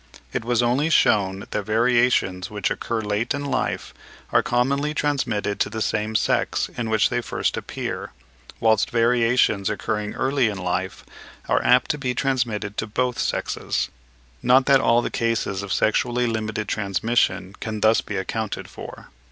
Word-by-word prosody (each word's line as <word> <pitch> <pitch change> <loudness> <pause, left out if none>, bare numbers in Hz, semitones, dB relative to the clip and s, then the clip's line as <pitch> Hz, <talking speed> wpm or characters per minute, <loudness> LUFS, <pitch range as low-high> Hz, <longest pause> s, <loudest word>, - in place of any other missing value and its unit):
It - - -2
was 120 0 +1
also 130 +6 +2
shewn 100 -10 +3
that 105 - -3
variations 110 -4 +2
which 105 -2 -2
occur 115 -1 -2
late 105 +5 -1
in 145 0 -4
life 125 - -2 0.4
are - - +4
commonly 140 +5 0
transmitted 125 -9 -1
to - - +1
the 110 +1 -5
same 110 0 -1
sex - - +1
in 115 -2 -3
which 110 -1 +3
they 125 - 0
first - - -2
appear; - - -5 0.5
whilst 110 -2 +3
variations 115 -3 +2
occurring 105 0 -3
early 130 -2 +1
in 100 - -5
life 90 0 -3 0.4
are - - +2
apt 125 0 +4
to 150 - -4
be 125 -2 -2
transmitted 115 -6 -1
to 110 - -2
both 125 +3 -1
sexes; - - -1 0.5
not 130 +1 +5
that 135 -1 +5
all 120 +1 +3
the - - -3
cases 115 -4 -1
of 100 -1 -6
sexually 120 +3 +1
limited 110 -2 -2
transmission 100 -1 0
can 110 -2 -4
thus 110 +1 +4
be - - -5
accounted - - -3
for. - - -10
115 Hz, 160 wpm, -23 LUFS, 105-125 Hz, 0.5 s, not